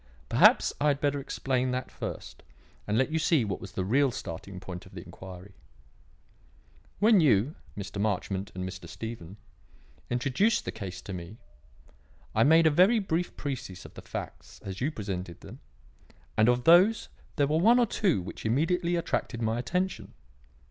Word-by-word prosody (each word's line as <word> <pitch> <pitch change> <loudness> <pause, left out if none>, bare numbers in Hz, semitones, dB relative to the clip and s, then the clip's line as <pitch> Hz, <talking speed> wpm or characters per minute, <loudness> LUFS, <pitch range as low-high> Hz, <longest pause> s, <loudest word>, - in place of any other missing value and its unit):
Perhaps - - +5
I 150 - +3
had 140 -1 +2
better 145 -1 0
explain 130 -1 -1
that 125 0 -3
first - - -7 0.5
and 105 +1 +1
let 130 +4 +1
you 160 - +1
see 155 -6 +2
what 100 - -4
was 95 - -9
the 95 - -2
real 135 +7 +3
starting 95 -3 -7
point 90 -1 -8
of - - -16
the - - -8
inquiry. 95 +1 -11 1.4
"When 215 -2 +5
you, 130 -1 +3 0.2
Mr. 100 0 -5
Marchmont 100 -1 -2
and 90 0 -3
Mr. 90 -2 -8
Stephen, 105 -2 -7 0.7
introduced 135 - +1
the - - -3
case 95 -5 -7
to 100 - -7
me, 90 +4 -8 1.0
I - - +4
made 160 +3 +6
a 160 - +6
very 185 +10 +5
brief 180 -4 -2
précis 120 -10 -5
of - - -12
the - - -10
facts - - -8
as 95 +1 -6
you 135 - +1
presented 95 - -6
them, - - -11 0.8
and 110 +1 +4
of 125 0 +2
these 185 - +5 0.3
there 145 - +3
were 155 +3 +1
one 230 +7 +6
or 245 - +4
two 185 - 0
which - - -8
immediately 170 +9 +1
attracted 150 -7 -2
my 115 0 0
attention. 180 +9 -2
125 Hz, 170 wpm, -28 LUFS, 95-160 Hz, 1.4 s, made